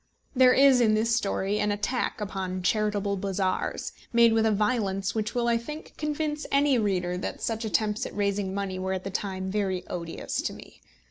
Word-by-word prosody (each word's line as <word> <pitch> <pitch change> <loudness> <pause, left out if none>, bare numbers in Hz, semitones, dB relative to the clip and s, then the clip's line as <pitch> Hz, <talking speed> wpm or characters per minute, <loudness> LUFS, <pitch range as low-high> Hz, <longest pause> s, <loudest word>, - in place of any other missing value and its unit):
There 255 0 +6
is 270 -2 +6
in 215 -2 +4
this 225 +1 +2
story 200 -2 0
an 210 - +1
attack 210 +5 -1
upon 190 -3 -4
charitable 205 0 +1
bazaars, 190 -1 -2 0.2
made 235 -1 +5
with 225 0 +3
a - - +3
violence 200 -3 0
which 220 +1 -2
will, 240 -1 +1
I 235 -1 +3
think, 300 +7 -8
convince 300 0 -2
any 280 -2 +3
reader 180 -4 0
that - - -4
such 225 0 -2
attempts 215 0 0
at - - -11
raising 200 -1 0
money 195 -1 -3
were 190 0 -2
at 185 -1 -3
the 195 - -5
time 190 -1 -3
very 190 -3 -1
odious 170 -2 -4
to - - -3
me. - - -14
210 Hz, 190 wpm, -27 LUFS, 190-235 Hz, 0.2 s, There